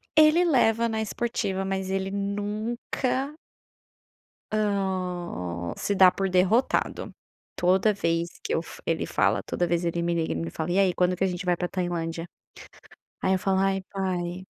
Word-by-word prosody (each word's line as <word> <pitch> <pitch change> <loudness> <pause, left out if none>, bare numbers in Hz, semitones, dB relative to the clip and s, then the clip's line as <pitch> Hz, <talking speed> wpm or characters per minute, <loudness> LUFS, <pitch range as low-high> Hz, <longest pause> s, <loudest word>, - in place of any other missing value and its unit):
Ele 310 +3 +6
leva 235 -8 +3
na 220 0 -1
esportiva, 210 -3 -2
mas 190 0 -2
ele 190 0 -1
nunca 215 +7 -2 1.2
hã, 180 - -2
se 205 - -1
dá 185 -1 +7
por 195 +1 -1
derrotado. 185 +7 +1 0.4
Toda 190 +4 +3
vez 170 -3 0
que 455 - -2
eu - - +1
f - - -11
ele - - 0
fala, - - +1
toda 175 - -1
vez 170 +1 0
ele 170 0 -1
me 170 0 0
liga 165 -1 0
e - - -5
me 85 0 -3
fala: 160 - -3
"E 185 - +3
aí, 190 -2 +4
quando 180 0 +2
que 190 - -1
a - - +4
gente 180 0 -4
vai 175 -1 +3
para 180 0 -2
Tailândia?" 170 -2 -3 1.0
Aí 190 - +2
eu 190 - +1
falo: 190 0 +1
"Ai, 195 0 +1
pai, 185 -2 -2
190 Hz, 170 wpm, -26 LUFS, 175-205 Hz, 1.2 s, dá